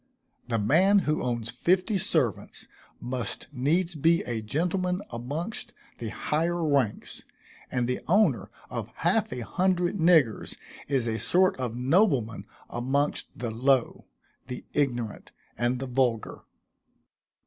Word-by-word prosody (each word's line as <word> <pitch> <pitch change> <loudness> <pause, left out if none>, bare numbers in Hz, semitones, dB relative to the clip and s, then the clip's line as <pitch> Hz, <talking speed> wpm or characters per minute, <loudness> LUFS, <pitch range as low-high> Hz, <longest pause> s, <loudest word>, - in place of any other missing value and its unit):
The 115 -2 0
man 170 - +4
who 150 +1 +1
owns 120 -2 -1
fifty 185 - +1
servants - - -1 0.3
must 125 -1 -3
needs 165 +7 +1
be 165 +2 +3
a 115 -2 -3
gentleman 180 - -1
amongst 145 - -4 0.3
the 115 - -4
higher 165 +7 -1
ranks, 135 -8 0 0.5
and 125 -2 0
the 125 - -1
owner 180 - +3 0.2
of - - -4
half - - +1
a 125 - -4
hundred 180 - 0
niggers 160 - +3 0.3
is 135 -4 +1
a 110 -1 -1
sort 185 - +3
of 120 -3 -2
nobleman 125 - +2 0.2
amongst 135 +5 -1
the 120 -1 -4
low, 130 +2 +1 0.4
the 125 -1 -6
ignorant, 120 -7 -2 0.2
and 120 +1 0
the 135 - -4
vulgar. 125 -3 -1
135 Hz, 125 wpm, -27 LUFS, 120-175 Hz, 0.5 s, man